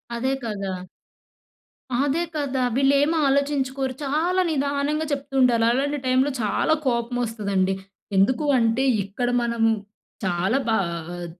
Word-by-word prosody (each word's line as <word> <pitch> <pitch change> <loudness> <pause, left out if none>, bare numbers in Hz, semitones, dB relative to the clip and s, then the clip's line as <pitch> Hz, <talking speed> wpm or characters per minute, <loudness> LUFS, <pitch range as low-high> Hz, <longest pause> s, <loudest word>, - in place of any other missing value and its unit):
అదే 260 +3 -1
కదా! 205 -4 -3 1.3
అదే 290 +4 +1
కదా! 270 -3 -1
వీళ్లేమి 280 +4 +3
ఆలోచించుకోరు. 270 -1 0
చాలా 325 +7 +1
నిదానంగా 285 +1 0
చెప్తూ 280 0 -4
ఉండాలి. 240 -3 +4
అలాంటి 285 +4 0
టైంలో 260 +2 +2
చాలా 215 +8 +1
కోపం 235 0 0
వస్తదండి. 200 -4 0 0.4
ఎందుకు 255 +10 +3
అంటే 230 +2 +2 0.2
ఇక్కడ 205 +6 -2
మనము 235 -1 +1 0.6
చాలా 185 +6 +1
బా 225 - +3 0.2
ఆహ్, 175 +2 -7
260 Hz, 115 wpm, -23 LUFS, 225-280 Hz, 1.3 s, ఉండాలి